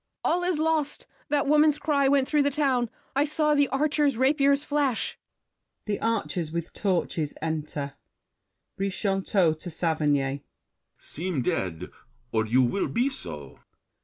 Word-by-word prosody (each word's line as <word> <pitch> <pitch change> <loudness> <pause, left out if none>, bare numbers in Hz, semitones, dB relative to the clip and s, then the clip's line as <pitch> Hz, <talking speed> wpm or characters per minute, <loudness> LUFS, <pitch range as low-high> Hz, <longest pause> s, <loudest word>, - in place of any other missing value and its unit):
All 355 - +2
is 355 -2 +1
lost! 315 -2 0 0.2
That 290 -2 +2
woman's 300 +1 +4
cry 285 -3 +2
went 270 -1 +3
through 300 -2 +2
the 285 - +3
town. 265 -5 +1 0.3
I 280 - +4
saw 300 0 +1
the 285 -1 +3
archers' 290 -1 +1
rapiers 280 +2 +3
flash. 285 -5 -1 0.7
[The 205 -2 -2
Archers 200 -8 -1
with 170 +1 -4
torches 175 -6 -1
enter. 150 -3 -3 0.9
BRICHANTEAU 195 -4 +1
(to 175 - -6
Saverny). 145 -4 0 0.6
Seem 165 -4 -4
dead, 90 -5 -2 0.4
Or 110 0 0
you 125 +4 +4
will 160 +11 0
be 245 +4 +1
so! 75 - -9
230 Hz, 135 wpm, -26 LUFS, -, 0.9 s, woman's